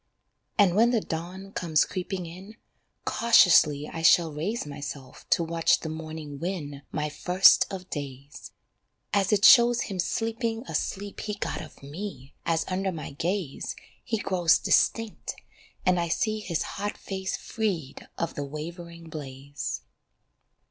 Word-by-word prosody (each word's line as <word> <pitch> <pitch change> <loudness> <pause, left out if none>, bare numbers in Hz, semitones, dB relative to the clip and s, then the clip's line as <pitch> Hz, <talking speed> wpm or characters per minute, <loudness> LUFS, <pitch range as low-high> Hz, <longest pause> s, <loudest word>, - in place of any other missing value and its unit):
And 195 -4 +5
when 230 +3 +5
the 240 -2 +3
dawn 185 +2 -6
comes 165 -6 +2
creeping 185 -1 -4
in, 185 +6 -10 0.5
Cautiously 160 -10 +5
I 165 - -6
shall 165 0 +5
raise 185 +10 -2
Myself 140 -2 -8
to 170 - +3
watch 165 0 +2
the 160 - -4
morning 155 -2 -7
win 155 -6 -4
My 150 -1 -1
first 180 +5 +5
of 185 -2 -6
days, 140 -1 -7 0.6
As 200 0 +2
it 205 -1 +4
shows 240 -1 +8
him 190 -2 -4
sleeping 225 +3 -1
a - - -6
sleep 200 +1 -3
he 210 -1 -3
got 205 - -3
Of 155 -3 -12
me, 145 -3 -7
as 165 -1 +1
under 190 +1 -1
my 160 -5 -6
gaze, 170 0 -3 0.3
He 230 -2 -1
grows 180 -5 +3
distinct, 225 -2 +1 0.5
and 180 -1 +3
I 170 - 0
see 215 +6 0
his 175 -6 -2
hot 205 +1 -4
Face 190 -1 -4
freed 185 -11 -3
of 165 - -2
the 145 - -4
wavering 170 +3 -8
blaze. 140 - -6
170 Hz, 145 wpm, -27 LUFS, 150-200 Hz, 0.6 s, shows